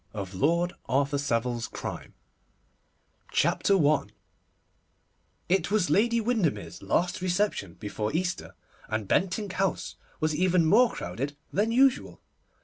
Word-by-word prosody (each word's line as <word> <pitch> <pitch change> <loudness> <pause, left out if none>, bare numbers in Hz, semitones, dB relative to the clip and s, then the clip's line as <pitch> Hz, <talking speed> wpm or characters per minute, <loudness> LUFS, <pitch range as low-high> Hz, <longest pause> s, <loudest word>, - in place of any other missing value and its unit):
H. 100 -2 -5
145 95 - -7
LORD 170 +3 +2 0.2
ARTHUR 140 +2 +1
SAVILE'S 120 -3 -1
CRIME - - -5
A - - -8
STUDY - - -15
OF - - -37 0.3
DUTY 195 -3 +3
CHAPTER - - +5
I 150 -1 +2 1.4
IT 185 -2 +2
was 205 -3 +1
Lady 235 +3 +3
Windermere's 220 - -1
last 175 +1 0
reception 180 - -1
before 105 0 -4
Easter, 180 +2 -2 0.3
and 110 -2 -3
Bentinck 190 - 0
House 190 -1 -2 0.2
was 155 -1 0
even 180 0 +3
more 230 +9 +5
crowded 135 +12 -5 0.2
than 210 +4 +1
usual. 260 +2 +2
175 Hz, 140 wpm, -27 LUFS, 135-200 Hz, 1.4 s, CHAPTER